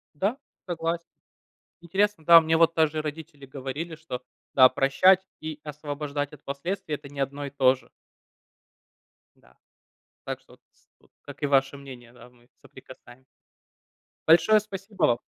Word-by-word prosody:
Да, 200 Hz, -, -1 dB, 0.3 s
согласен. 170 Hz, -1 st, -3 dB, 0.7 s
Интересно, 195 Hz, +1 st, 0 dB
да, 170 Hz, +1 st, +10 dB
мне 160 Hz, 0 st, +1 dB
вот 165 Hz, 0 st, +4 dB
даже 155 Hz, -1 st, +2 dB
родители 150 Hz, -1 st, -8 dB
говорили, 135 Hz, +5 st, -6 dB
что 150 Hz, -5 st, -7 dB, 0.3 s
да, 130 Hz, -1 st, +8 dB
прощать 180 Hz, +9 st, +3 dB
и 155 Hz, -1 st, -6 dB
освобождать 145 Hz, -1 st, -5 dB
от 150 Hz, -, -14 dB
последствий 150 Hz, +3 st, -4 dB
это 140 Hz, -, -11 dB
не 140 Hz, 0 st, -10 dB
одно 140 Hz, +1 st, -3 dB
и -, -, -5 dB
то 130 Hz, -2 st, +3 dB
же. 130 Hz, -, -20 dB, 1.5 s
Да. -, -, -25 dB, 0.7 s
Так -, -, -4 dB
что -, -, -21 dB
вот, -, -, -21 dB
с -, -, -35 dB
вот -, -, -28 dB
как 145 Hz, 0 st, -12 dB
и -, -, +3 dB
ваше 135 Hz, 0 st, +2 dB
мнение 130 Hz, -4 st, -12 dB
да, 125 Hz, 0 st, -15 dB
мы 120 Hz, -1 st, -26 dB
соприкасаем 130 Hz, -1 st, -15 dB, 1.0 s
Большое 170 Hz, +7 st, +6 dB
спасибо 200 Hz, -1 st, -10 dB
вам. 120 Hz, -5 st, +3 dB
150 Hz, 150 wpm, -26 LUFS, 135-165 Hz, 1.5 s, да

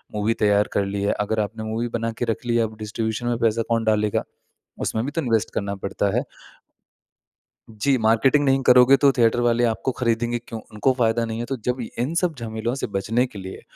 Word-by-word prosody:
Movie 105 Hz, +2 st, +1 dB
तैयार 105 Hz, 0 st, +3 dB
कर 100 Hz, -, +1 dB
ली 100 Hz, 0 st, -3 dB
है 100 Hz, -, +1 dB
अगर 105 Hz, +2 st, -1 dB
आपने 105 Hz, +1 st, -3 dB
मूवी 110 Hz, +2 st, -2 dB
बनाकर 115 Hz, +1 st, -3 dB
रख 115 Hz, -, -3 dB
लिया 120 Hz, -1 st, +2 dB
अब 110 Hz, 0 st, -9 dB
डिस्ट्रीब्यूशन 110 Hz, +2 st, -3 dB
में 120 Hz, -1 st, 0 dB
पैसा 115 Hz, -1 st, +2 dB
कौन 115 Hz, -1 st, +1 dB
डालेगा, 105 Hz, -1 st, +1 dB, 0.6 s
उसमें 110 Hz, +1 st, -2 dB
भी 140 Hz, -, -3 dB
तो 165 Hz, -, -2 dB
इन्वेस्ट 115 Hz, -5 st, 0 dB
करना 100 Hz, -1 st, -2 dB
पड़ता 100 Hz, +2 st, -2 dB
है। 125 Hz, -, +2 dB, 1.5 s
जी 130 Hz, +5 st, +1 dB
मार्केटिंग 115 Hz, +6 st, +3 dB
नहीं 135 Hz, -1 st, +3 dB
करोगे 125 Hz, +1 st, +7 dB
तो 140 Hz, -1 st, +5 dB
थिएटर 120 Hz, -2 st, +2 dB
वाले 120 Hz, 0 st, +2 dB
आपको 115 Hz, +3 st, -1 dB
खरीदेंगे 120 Hz, -1 st, 0 dB
क्यों 115 Hz, -1 st, -8 dB
उनको 105 Hz, +5 st, +1 dB
फ़ायदा 115 Hz, 0 st, +2 dB
नहीं 115 Hz, 0 st, -4 dB
है। 120 Hz, -, -3 dB
तो 135 Hz, -, -3 dB
जब 125 Hz, +1 st, 0 dB, 0.2 s
इन 130 Hz, +7 st, -1 dB
सब 170 Hz, -2 st, +1 dB
झमेलों 115 Hz, +1 st, -3 dB
से -, -, -1 dB
बचने 105 Hz, +5 st, 0 dB
के 105 Hz, -, -10 dB
लिए 95 Hz, 0 st, -8 dB
115 Hz, 205 wpm, -23 LUFS, 110-120 Hz, 1.5 s, करोगे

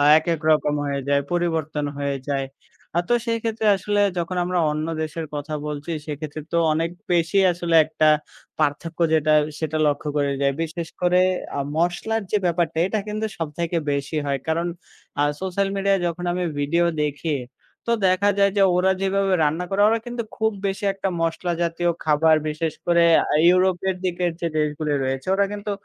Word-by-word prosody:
আ -, -, +4 dB, 0.2 s
একেক 165 Hz, -1 st, -2 dB
রকম 150 Hz, -1 st, +3 dB
হয়ে 140 Hz, -1 st, -2 dB
যায়। 140 Hz, 0 st, +3 dB
পরিবর্তন 160 Hz, -4 st, -1 dB
হয়ে 140 Hz, -1 st, -1 dB
যায়। 135 Hz, -1 st, -1 dB, 0.5 s
আ -, -, +5 dB
তো 240 Hz, -, +4 dB
সেইক্ষেত্রে 225 Hz, -1 st, -1 dB
আসলে 205 Hz, +2 st, 0 dB, 0.2 s
যখন 175 Hz, +2 st, -2 dB
আমরা 180 Hz, 0 st, -1 dB
অন্য 155 Hz, +1 st, -2 dB, 0.2 s
দেশের 155 Hz, +1 st, -4 dB
কথা 150 Hz, +1 st, -4 dB
বলছি, 150 Hz, +2 st, -5 dB, 0.2 s
সেক্ষেত্রে 150 Hz, +1 st, -5 dB
তো -, -, +1 dB, 0.2 s
অনেক 165 Hz, +2 st, 0 dB, 0.2 s
বেশি 170 Hz, +3 st, +2 dB
আসলে 170 Hz, -1 st, -2 dB
একটা 155 Hz, 0 st, 0 dB, 0.5 s
পার্থক্য 155 Hz, +3 st, -1 dB
যেটা 155 Hz, -1 st, +3 dB, 0.3 s
সেটা 155 Hz, -1 st, -2 dB
লক্ষ্য 145 Hz, +1 st, 0 dB
করে 140 Hz, -1 st, +1 dB
যায়। 140 Hz, 0 st, +2 dB
বিশেষ 165 Hz, +1 st, -4 dB
করে 180 Hz, 0 st, +3 dB, 0.4 s
আ -, -, 0 dB, 0.2 s
মসলার 175 Hz, +7 st, 0 dB
যে 210 Hz, -, +2 dB
ব্যাপারটা 170 Hz, -2 st, 0 dB
এটা 215 Hz, +2 st, -1 dB
কিন্তু 215 Hz, +1 st, -2 dB
সবথেকে 165 Hz, +2 st, -3 dB, 0.2 s
বেশি 140 Hz, +3 st, -3 dB
হয়। 140 Hz, -1 st, 0 dB
কারণ 165 Hz, +2 st, 0 dB, 0.5 s
আ -, -, +4 dB, 0.2 s
সোশ্যাল 190 Hz, +1 st, -1 dB
মিডিয়ায় 195 Hz, 0 st, +2 dB
যখন 175 Hz, +1 st, -3 dB
আমি 180 Hz, 0 st, -1 dB
ভিডিও 170 Hz, +4 st, +1 dB, 0.2 s
দেখি 150 Hz, +1 st, -1 dB, 0.5 s
তো -, -, -1 dB, 0.2 s
দেখা 185 Hz, +2 st, +3 dB
যায়, 200 Hz, 0 st, +4 dB
যে 200 Hz, -, +4 dB
ওরা 185 Hz, +1 st, +3 dB
যেভাবে 195 Hz, 0 st, +1 dB
রান্না 160 Hz, +4 st, 0 dB
করে, 195 Hz, +1 st, 0 dB
ওরা 225 Hz, +1 st, +2 dB
কিন্তু 240 Hz, -1 st, -3 dB
খুব 220 Hz, 0 st, +1 dB
বেশি 195 Hz, +2 st, -3 dB
একটা 195 Hz, 0 st, -3 dB
মসলা 165 Hz, +2 st, -1 dB
জাতীয় 170 Hz, +1 st, 0 dB
খাবার 155 Hz, +1 st, +4 dB
বিশেষ 155 Hz, +1 st, -2 dB
করে 170 Hz, -1 st, +4 dB, 0.2 s
আ -, -, -1 dB
ইউরোপের 185 Hz, +1 st, +2 dB
দিকের 175 Hz, -1 st, 0 dB
যে 170 Hz, -, -1 dB
দেশগুলি 150 Hz, 0 st, -1 dB
রয়েছে, 130 Hz, 0 st, -3 dB
ওরা 200 Hz, +1 st, +3 dB
কিন্তু 205 Hz, 0 st, -5 dB
170 Hz, 175 wpm, -23 LUFS, 150-190 Hz, 0.5 s, আ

